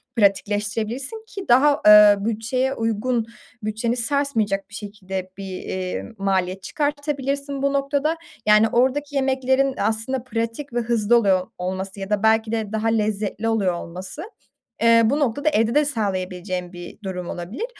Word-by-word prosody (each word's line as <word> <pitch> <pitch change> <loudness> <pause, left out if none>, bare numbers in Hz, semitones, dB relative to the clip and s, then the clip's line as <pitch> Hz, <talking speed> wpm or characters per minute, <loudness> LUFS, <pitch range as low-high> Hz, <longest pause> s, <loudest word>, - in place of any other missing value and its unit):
pratikleştirebilirsin, 215 - 0
ki 390 -4 -7
daha, 280 +4 +5
eee, 210 -1 +9
bütçeye 230 +4 -1
uygun, 230 0 -1 0.4
bütçeni 220 +3 -1
sarsmayacak 230 -6 0
bir - - -19
şekilde 195 -3 -6
bir, 195 -1 -6
eee, 185 -1 -4
maliyet 190 -1 -1
çıkartabilirsin 285 -1 -2
bu 280 0 +1
noktada. 285 +3 0 0.3
Yani, 215 +1 +6
oradaki 280 +4 +1
yemeklerin 265 0 +1
aslında 225 +3 -1
pratik 230 +2 -4
ve 240 - +1
hızlı 235 -1 +2
oluyor 190 -5 +2
olması 190 +2 -4
ya 195 0 -5
da 210 0 0
belki 220 0 +3
de 220 -3 -2
daha 220 +1 -1
lezzetli 215 -1 -1
oluyor 200 -5 +1
olması, 185 - -7 0.6
eee, 230 0 +6
bu 265 +7 +2
noktada 285 +2 +1
evde 230 -4 +1
de 300 +1 +4
sağlayabileceğin 185 -7 -3
bir 175 -1 -10
durum 180 -2 -4
olabilir. 190 - -5
225 Hz, 140 wpm, -22 LUFS, 200-265 Hz, 0.6 s, eee